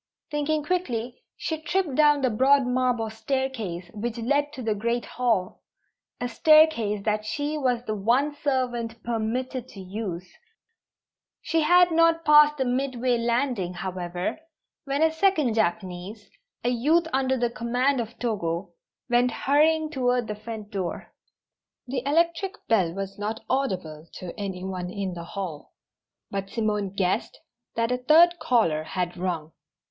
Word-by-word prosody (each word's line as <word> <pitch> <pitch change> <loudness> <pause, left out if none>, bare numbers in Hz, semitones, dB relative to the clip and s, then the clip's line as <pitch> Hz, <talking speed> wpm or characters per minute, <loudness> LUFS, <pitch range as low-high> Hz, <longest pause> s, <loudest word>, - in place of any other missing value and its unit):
Thinking 295 +1 0
quickly, 255 -9 -2 0.2
she 320 -1 -3
tripped 345 -2 0
down 295 0 +4
the 255 - +3
broad 265 +4 +4
marble 250 -3 0
staircase 220 -7 -3
which 225 +2 -4
led 285 +5 +1
to 255 - -7
the 220 -1 +1
great 235 +3 -1
hall 225 -7 -1 0.6
a 245 - -1
staircase 245 -7 +4
that 215 -1 0
she 290 +7 -2
was 250 -5 0
the 215 - -2
one 240 +8 +1
servant 245 -6 -2
permitted 240 +2 -2
to 200 - -12
use. 185 -2 -5 1.2
She 325 0 +1
had 355 +3 +5
not 330 0 +3
passed 300 0 +7
the 265 - 0
midway 250 -1 0
landing, 235 -6 0
however, 180 - -4 0.5
when 280 +2 0
a 320 - +4
second 320 - +2
Japanese 195 0 -2 0.3
a 240 - +2
youth 300 +8 +2
under 265 0 +1
the 240 -1 0
command 245 +3 0
of 230 +1 -8
Togo 175 -6 -2 0.4
went 245 0 +3
hurrying 310 +5 +2
toward 250 -3 +1
the 210 - -3
front 215 0 -8
door. 190 -3 -4 0.7
The 255 0 -3
electric 335 +6 +1
bell 190 -7 +3
was 195 +2 -6
not 215 +2 -3
audible 185 - -2
to 180 -2 -7
any 195 -3 -5
one 185 -2 -4
in 190 -1 -4
the 170 -1 -7
hall, 175 -5 -6 0.6
but 195 0 -3
Simone 210 -3 -1
guessed 190 +2 -1 0.4
that 230 +1 0
a 250 - +1
third 335 +6 +5
caller 230 - +2
had 175 +2 -3
rung. 175 -3 -3
240 Hz, 145 wpm, -26 LUFS, 200-280 Hz, 1.2 s, passed